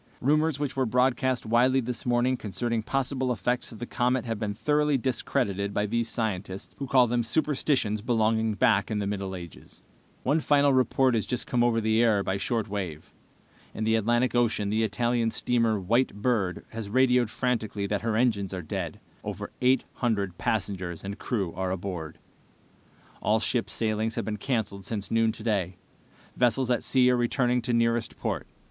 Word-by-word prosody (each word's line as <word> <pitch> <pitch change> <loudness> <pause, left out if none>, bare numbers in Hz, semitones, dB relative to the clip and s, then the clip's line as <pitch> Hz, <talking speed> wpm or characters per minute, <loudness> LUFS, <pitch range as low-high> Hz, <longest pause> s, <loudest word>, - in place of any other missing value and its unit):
Rumors 150 +2 +2
which 145 -2 -2
were 130 -2 +1
broadcast 125 +1 +1
widely 125 +4 +3
this 125 0 -4
morning 120 +1 +2
concerning 115 +1 -2
possible 130 +1 -1
effects 120 +2 -1
of 115 - -10
the 120 - -5
comet 125 +1 0
have 115 -3 -3
been 105 -2 -2
thoroughly 150 +3 +2
discredited 105 -6 -1
by 105 - +1
these 115 +2 -1
scientists, 100 -4 -3
who 140 - -3
call 130 -1 +5
them 120 0 0
superstitions 130 -4 0
belonging 110 -1 +1
back 100 -1 +3
in 110 - -1
the 100 - -1
Middle 100 -1 -3
Ages. 85 -2 -11 0.4
"One 145 +5 +2
final 145 -2 +3
report 130 0 +3
has 110 -3 0
just 125 - -2
come 120 -1 +1
over 120 -1 +2
the 110 +1 +2
air 110 -4 +3
by 95 0 -1
shortwave. 100 - -3 0.6
In 110 - -3
the 110 +1 +2
Atlantic 120 +3 +2
Ocean 110 -4 +1
the 110 +1 +1
Italian 115 +2 +1
steamer 115 -2 +1
White 115 +6 +1
Bird 105 -4 -1
has 110 -2 -6
radioed 125 0 +3
frantically 110 -5 -1
that 100 0 -1
her 115 -1 -1
engines 105 -5 +1
are 90 - -5
dead. 80 - -4 0.2
Over - - -5
eight 130 +1 +4
hundred 100 -7 -1
passengers 95 -5 -2
and 100 +2 -6
crew 100 -9 -2
are 95 0 -2
aboard. 90 -4 -5 1.0
"All 110 +1 +2
ship 115 +1 0
sailings 110 0 -1
have - - -2
been 105 -1 -3
canceled 105 -4 -2
since 100 0 -4
noon 115 0 +3
today. 105 -5 -2 0.6
Vessels 125 +1 +2
at 120 - +2
sea 125 -1 +4
are - - +3
returning 125 0 +1
to 120 - -2
nearest 115 0 +1
port. - - -3
115 Hz, 175 wpm, -27 LUFS, 105-125 Hz, 1.0 s, call